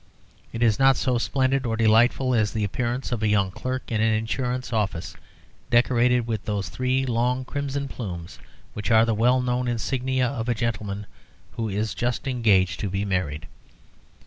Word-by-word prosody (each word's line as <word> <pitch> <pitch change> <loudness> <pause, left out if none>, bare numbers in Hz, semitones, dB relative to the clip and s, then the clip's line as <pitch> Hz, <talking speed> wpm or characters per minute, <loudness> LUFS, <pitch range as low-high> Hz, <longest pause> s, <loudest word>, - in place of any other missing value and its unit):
It 115 +1 -2
is 110 -1 +3
not 135 -1 +5
so 125 -2 +1
splendid 135 +1 +1
or 115 -3 -1
delightful 115 +4 +3
as 110 -3 +1
the 110 - -1
appearance 120 +6 -2
of 120 -3 -2
a 110 - +2
young 100 -2 +2
clerk 130 +6 -5
in 110 -1 +1
an 110 0 +3
insurance 125 +3 -2
office 100 -6 -2 0.5
decorated 120 0 +3
with 110 -3 -3
those 100 -2 -2
three 130 +1 0
long 125 +1 0
crimson 140 0 -3
plumes 90 -9 -7 0.3
which 105 +2 -4
are 110 0 +5
the 115 - +1
well 125 +4 +3
known 125 0 -1
insignia 130 +2 0
of 125 -2 -3
a 120 - +1
gentleman 105 -3 -3 0.5
who 115 -1 -3
is 105 +2 -2
just 120 +2 -2
engaged 105 -9 +2
to 100 - -2
be 95 +2 -2
married. 85 -5 -2
115 Hz, 170 wpm, -24 LUFS, 105-125 Hz, 0.5 s, not